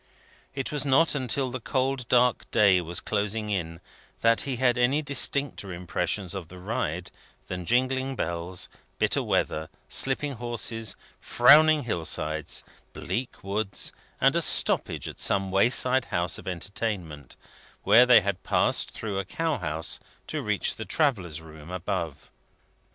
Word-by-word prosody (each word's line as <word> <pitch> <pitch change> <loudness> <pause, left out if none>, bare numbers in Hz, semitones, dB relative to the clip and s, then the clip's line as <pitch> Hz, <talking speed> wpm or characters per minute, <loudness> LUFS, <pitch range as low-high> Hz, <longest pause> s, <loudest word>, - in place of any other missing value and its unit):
It 135 -2 -3
was 145 -3 0
not 145 +4 +4
until 130 -1 -1
the 130 - -4
cold 130 0 -1
dark 125 -1 +3
day 95 -4 +4
was 85 +1 -3
closing 105 +1 -2
in, 85 -4 -3 0.4
that 115 0 +4
he 130 - -1
had 125 0 +2
any 130 +5 +2
distincter 140 -5 0
impressions 90 +2 -2
of 95 -4 -6
the 90 - -12
ride 90 -3 -3 0.4
than 90 -2 -5
jingling 130 +2 +1
bells, 85 -1 -3 0.3
bitter - - +2
weather, 80 0 -1 0.2
slipping 140 +2 0
horses, 115 -2 -1 0.2
frowning 150 +4 +6
hill 90 -9 -2
sides, 80 -1 -3 0.3
bleak 125 +1 -4
woods, 100 +1 -1 0.3
and - - +4
a - - +2
stoppage - - +2
at - - -8
some 95 -1 +2
wayside 125 +5 +2
house 85 -1 -1
of - - -12
entertainment, 90 - -5 0.5
where 125 +2 +6
they 120 -3 +8
had 95 -1 -2
passed - - +1
through 105 -3 -4
a - - -2
cow 165 +4 -2
house 80 -1 -3 0.3
to - - -3
reach - - 0
the - - -4
travellers' 95 - 0
room 80 -1 -13
above. 85 -4 -4
105 Hz, 145 wpm, -27 LUFS, 90-130 Hz, 0.5 s, they